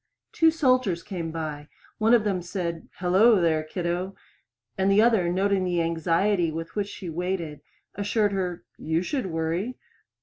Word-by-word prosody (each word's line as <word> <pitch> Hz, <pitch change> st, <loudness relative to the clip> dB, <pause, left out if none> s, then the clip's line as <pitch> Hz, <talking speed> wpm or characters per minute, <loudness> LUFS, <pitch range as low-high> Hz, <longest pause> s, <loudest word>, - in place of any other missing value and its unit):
Two 325 Hz, -, +4 dB
soldiers 255 Hz, -, +2 dB
came 170 Hz, -4 st, -4 dB
by; 155 Hz, -2 st, -5 dB, 0.3 s
one 225 Hz, +2 st, +5 dB
of 230 Hz, -, +3 dB
them 195 Hz, -4 st, 0 dB
said, 170 Hz, -2 st, -4 dB
"Hello, 190 Hz, +5 st, +4 dB
there, 160 Hz, -2 st, +2 dB
kiddo," 175 Hz, +4 st, -3 dB, 0.6 s
and 190 Hz, +1 st, +1 dB
the 200 Hz, -, +5 dB
other, 220 Hz, -6 st, +4 dB
noting 195 Hz, +1 st, +1 dB
the 175 Hz, -1 st, 0 dB
anxiety 170 Hz, +2 st, +1 dB
with 165 Hz, +1 st, -6 dB
which 205 Hz, -1 st, -1 dB
she 195 Hz, -2 st, -8 dB
waited, 170 Hz, -2 st, -3 dB, 0.3 s
assured 205 Hz, +1 st, +1 dB
her, 180 Hz, -7 st, -3 dB, 0.2 s
"You 160 Hz, +2 st, 0 dB
should 255 Hz, +1 st, -2 dB
worry." 165 Hz, +8 st, -2 dB
180 Hz, 155 wpm, -26 LUFS, 165-205 Hz, 0.6 s, one